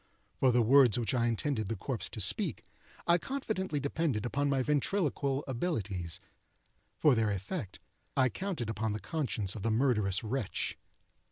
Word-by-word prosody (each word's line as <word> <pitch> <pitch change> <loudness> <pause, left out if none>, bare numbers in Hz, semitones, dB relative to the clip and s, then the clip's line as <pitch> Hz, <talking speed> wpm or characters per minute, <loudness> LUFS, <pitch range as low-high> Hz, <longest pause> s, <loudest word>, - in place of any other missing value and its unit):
For 130 - +3
the 120 0 +4
words 125 -1 +6
which 120 +2 -1
I 120 -2 +2
intended 115 -1 -1
the 115 - -2
corpse - - -3
to - - -7
speak, - - +1 0.4
I 170 +1 +4
confidently 200 - -2
depended 140 -5 -1
upon 140 +3 0
my 135 -2 +2
ventriloquial 145 -2 0
abilities; 105 - -2 0.8
for 150 - +5
their 115 -3 +2
effect, 100 - -4 0.4
I 130 -1 +5
counted 170 - -3
upon 110 -1 -1
the 105 - -3
conscience 110 - -2
of 110 - -6
the 115 - 0
murderous 110 -5 +2
wretch. 115 -1 -2
125 Hz, 155 wpm, -32 LUFS, 110-145 Hz, 0.8 s, words